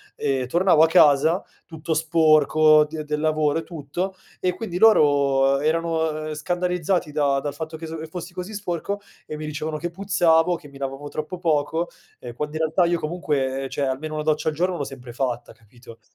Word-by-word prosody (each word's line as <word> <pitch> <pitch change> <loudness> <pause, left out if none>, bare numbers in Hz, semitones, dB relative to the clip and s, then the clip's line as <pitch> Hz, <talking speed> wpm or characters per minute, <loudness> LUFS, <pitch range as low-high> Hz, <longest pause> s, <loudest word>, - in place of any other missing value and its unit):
ehm, 130 -2 -1
tornavo 175 +2 +3
a - - +6
casa 160 +1 +4 0.2
tutto 160 0 -4
sporco 155 -1 +4
d 155 0 -6
del 150 0 -3
lavoro 155 0 +1
e - - -6
tutto 170 +4 -5 0.2
e 180 0 0
quindi 180 -6 -5
loro 140 -9 +4
erano, 160 0 -1
ehm, 155 - -4
scandalizzati 175 +1 -1
da 140 -2 +1
dal 145 0 -4
fatto 160 +2 -6
che 165 - -8
s 160 0 -6
che 160 - -6
fossi 175 +1 -8
così 185 +4 -6
sporco 200 +1 -3 0.3
e 155 - -6
mi 155 - -6
dicevano 155 +1 -4
che 175 +3 -4
puzzavo, 175 -3 +2
che 165 -3 -11
mi 140 -1 -14
lavavo 135 +1 -5
troppo 155 +4 -5
poco, 165 0 0 0.3
ehm, 120 -1 -8
quando 150 +4 -5
in 160 - -2
realtà 160 +3 +2
io 170 0 +1
comunque, 145 -5 -2
ehm, 135 - -5
cioè 140 - -2
almeno 150 +4 -3
1 150 - -2
doccia 155 0 +1
al 155 - -5
giorno 180 +2 0
l'ho 145 - -2
sempre 130 -3 -9
fatta, 120 -2 -3
capito? 115 +1 -16
155 Hz, 195 wpm, -23 LUFS, 145-170 Hz, 0.3 s, a